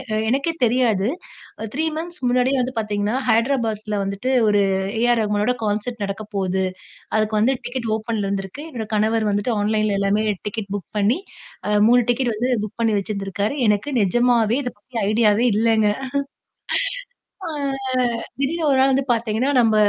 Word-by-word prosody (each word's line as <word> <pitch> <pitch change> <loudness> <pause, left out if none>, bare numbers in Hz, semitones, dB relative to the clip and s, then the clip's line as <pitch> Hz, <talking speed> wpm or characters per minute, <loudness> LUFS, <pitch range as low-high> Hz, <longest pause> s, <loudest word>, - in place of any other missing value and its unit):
எ - - +1
எனக்கே 275 +7 +1
தெரியாது. 230 -4 +2 0.7
3 315 +4 0
மந்த்த்ஸ் 340 -1 -6
முன்னாடியே 255 +2 +2
வந்து 255 +1 -2
பார்த்தீங்கன்னா, 210 +1 -1
ஹைதராபாத்ல 220 -3 +1
வந்துட்டு 200 +7 -2 0.2
ஒரு 205 -1 +4 0.4
ஏ - - +1
ஆர் 235 - +1
ரகுமனோட 210 +3 +1
கான்செர்ட் 210 +2 -2
நடக்க 195 +2 -5
போகுது. 190 -1 0 0.5
அதுக்கு 215 0 +1
வந்து 255 +5 +3
டிக்கெட் 245 -2 -3
ஓப்பன்ல 220 -2 -3
இருந்திருக்கு. 195 +8 -4
என்னோட 230 -5 -5
கணவர் 215 0 +2
வந்துட்டு 205 +4 0
ஆன்லைன்ல 215 -1 +1
எல்லாமே 200 +2 +1 0.2
டிக்கெட் 205 -2 -5
புக் 195 - -8
பண்ணி, 215 - +2 0.5
அ - - 0 0.2
3 245 +1 +5
டிக்கெட் 240 -2 0
வந்து 245 +4 0
புக் 215 - -9
பண்ணி 225 -2 +2
வச்சிருந்திருக்காரு. 200 +4 -2
எனக்கு 210 +7 +1
நிஜமாவே 235 +3 +3
இத 245 - -3
பத்தி 235 +3 -7
ஐடியாவே 220 +1 +3
இல்லங்க. 220 -1 +3 1.6
அ. - - -3 0.5
ஆ 255 - +3 0.4
திடீர்னு 315 +5 -1
ஒரு 265 - +3
நாள் 270 +1 +5
வந்து 270 +1 +2
பார்த்தீங்கன்னா, 230 +3 0
"நம்ம 225 -2 +3
220 Hz, 155 wpm, -21 LUFS, 205-245 Hz, 1.6 s, 3